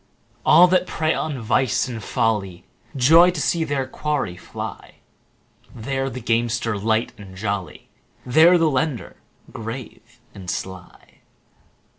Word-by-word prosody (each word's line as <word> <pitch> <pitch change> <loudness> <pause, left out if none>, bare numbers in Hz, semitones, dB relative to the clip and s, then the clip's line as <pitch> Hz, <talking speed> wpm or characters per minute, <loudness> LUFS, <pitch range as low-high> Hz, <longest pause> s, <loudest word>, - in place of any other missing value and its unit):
All 170 +3 +7
that 185 0 +2
prey 160 -2 0
on 150 -4 -3
vice 120 +3 +1
and 115 -4 -6
folly 105 -7 -1 0.3
Joy 160 +7 +6
to 175 -3 -3
see 165 +4 +1
their 140 -4 -1
quarry 140 -8 -3
fly: 90 - -8 0.8
There 135 +3 -3
the 125 - -7
gamester, 115 -1 0
light 110 +3 0
and 95 -2 -11
jolly, 100 -5 -4 0.4
15 125 - -8
There 170 +4 +7
the 165 -2 +3
lender, 135 -1 -2 0.3
grave 120 +1 -9
and 95 -3 -9
sly. 95 0 -7
125 Hz, 130 wpm, -22 LUFS, 110-150 Hz, 0.8 s, All